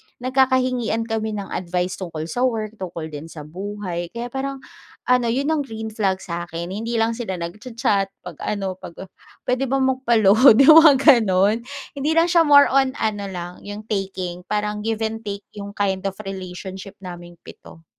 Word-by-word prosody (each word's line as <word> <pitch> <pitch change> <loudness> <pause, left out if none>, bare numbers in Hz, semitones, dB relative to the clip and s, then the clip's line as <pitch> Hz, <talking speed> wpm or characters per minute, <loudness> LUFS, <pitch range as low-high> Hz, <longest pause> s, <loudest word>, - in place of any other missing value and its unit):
nagkakahingian 255 -3 +1
kami 220 -1 -3
ng 200 -2 -5
advice 180 0 -2
tungkol 165 -4 -5
sa 245 +10 0
work, 220 -3 -2
tungkol 170 -4 -6
din 150 +2 -7
sa 160 -2 -9
buhay 180 +1 -5
kaya 235 +1 -5
parang 270 +1 -4 0.5
ano, 250 -1 +4
'yon 270 +6 0
ang 315 - +1
green 220 -2 -6
flag 195 -3 -1
sa'kin. 170 0 -5
Hindi 225 +4 -4
lang 225 0 +1
sila 220 -6 -3
nagcha-chat 210 +2 -1 0.2
'pag 180 -4 -9
ano, 195 -3 -3
'pag, 170 - -10 0.5
"Puwede 255 +2 0
ba 265 - 0
magpa-load," 235 -3 +5
yung 310 +3 +9
mga 305 -3 +7 0.2
gano'n. 200 +1 +2 0.4
Hindi 290 +3 0
lang 335 +1 +4
siya 335 -2 +4
more 285 -1 +7
on 265 -1 +3
ano 205 -2 -1
lang, 175 -2 -6
yung 205 +1 -6
taking. 185 -3 -3
Parang 210 0 -1
give 225 0 -1
and 220 0 -2
take 200 0 -5
yung 200 0 -7
kind 195 -1 -1
of 195 - -4
relationship 190 0 -7
naming 175 -1 -9
7. 165 - -14
210 Hz, 170 wpm, -22 LUFS, 185-245 Hz, 0.5 s, yung